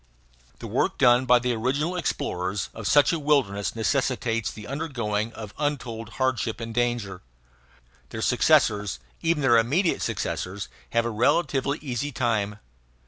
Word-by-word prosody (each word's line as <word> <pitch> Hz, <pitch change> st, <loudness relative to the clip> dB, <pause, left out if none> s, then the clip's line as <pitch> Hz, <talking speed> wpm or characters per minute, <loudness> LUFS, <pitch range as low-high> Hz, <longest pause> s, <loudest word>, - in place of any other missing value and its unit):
The -, -, -9 dB
work -, -, 0 dB
done 125 Hz, +1 st, +4 dB
by 125 Hz, 0 st, +7 dB
the 125 Hz, 0 st, 0 dB
original 140 Hz, +9 st, -1 dB
explorers 95 Hz, -, -2 dB
of 110 Hz, -2 st, -5 dB
such 145 Hz, +3 st, +5 dB
a 165 Hz, -, -1 dB
wilderness 120 Hz, -, +1 dB
necessitates 115 Hz, -3 st, 0 dB
the 105 Hz, +2 st, -9 dB
undergoing 115 Hz, -7 st, -2 dB
of 110 Hz, -2 st, -8 dB
untold 125 Hz, -6 st, -3 dB
hardship 130 Hz, -4 st, 0 dB
and 115 Hz, -1 st, -5 dB
danger. 120 Hz, -6 st, -1 dB, 0.9 s
Their -, -, -5 dB
successors, 105 Hz, -, +3 dB, 0.2 s
even 165 Hz, -3 st, +1 dB
their 120 Hz, -3 st, +6 dB
immediate 160 Hz, -, +1 dB
successors, 95 Hz, +1 st, -3 dB, 0.2 s
have 115 Hz, 0 st, +1 dB
a 120 Hz, -, -1 dB
relatively 135 Hz, +4 st, +1 dB
easy 140 Hz, +1 st, -3 dB
time. 110 Hz, -5 st, -1 dB
120 Hz, 140 wpm, -25 LUFS, 110-140 Hz, 0.9 s, by